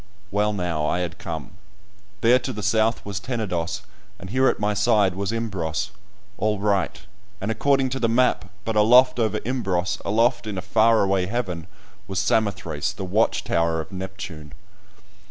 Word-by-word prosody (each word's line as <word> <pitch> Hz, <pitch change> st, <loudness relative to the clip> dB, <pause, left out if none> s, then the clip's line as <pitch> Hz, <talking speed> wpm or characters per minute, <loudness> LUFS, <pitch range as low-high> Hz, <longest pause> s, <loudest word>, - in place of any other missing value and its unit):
Well, 105 Hz, +1 st, +2 dB
now 85 Hz, -6 st, -1 dB
I 90 Hz, -, 0 dB
had 85 Hz, -1 st, -4 dB
come; 80 Hz, -3 st, -6 dB, 0.7 s
there 120 Hz, +2 st, +5 dB
to 130 Hz, +1 st, -4 dB
the 105 Hz, -4 st, -6 dB
south 110 Hz, +3 st, +1 dB
was 100 Hz, -1 st, -3 dB
Tenedos, 100 Hz, -6 st, -3 dB, 0.3 s
and 95 Hz, 0 st, -9 dB
here 130 Hz, +2 st, +3 dB
at -, -, +1 dB
my 105 Hz, 0 st, +1 dB
side 105 Hz, -3 st, +3 dB
was 100 Hz, +2 st, -2 dB
Imbros, 95 Hz, -5 st, -2 dB, 0.5 s
all 105 Hz, -1 st, +1 dB
right, 100 Hz, -2 st, 0 dB, 0.4 s
and 100 Hz, +3 st, -2 dB
according 135 Hz, +3 st, +2 dB
to 135 Hz, +1 st, -3 dB
the 115 Hz, -, +1 dB
map, 125 Hz, -2 st, +2 dB, 0.2 s
but 110 Hz, -, -1 dB
aloft 125 Hz, +4 st, +6 dB
over 110 Hz, -3 st, +1 dB
Imbros, 95 Hz, -8 st, -1 dB
aloft 115 Hz, +3 st, +2 dB
in 105 Hz, -3 st, -4 dB
a -, -, -2 dB
far 115 Hz, +2 st, +4 dB
away 95 Hz, -2 st, +1 dB
heaven, 90 Hz, -7 st, -3 dB, 0.4 s
was 95 Hz, -1 st, -4 dB
Samothrace, 100 Hz, +1 st, 0 dB
the 95 Hz, -, -5 dB
watch 105 Hz, +5 st, +1 dB
tower 85 Hz, -1 st, +1 dB
of 80 Hz, +5 st, -6 dB
Neptune! 95 Hz, -6 st, -7 dB
105 Hz, 165 wpm, -24 LUFS, 95-115 Hz, 0.7 s, aloft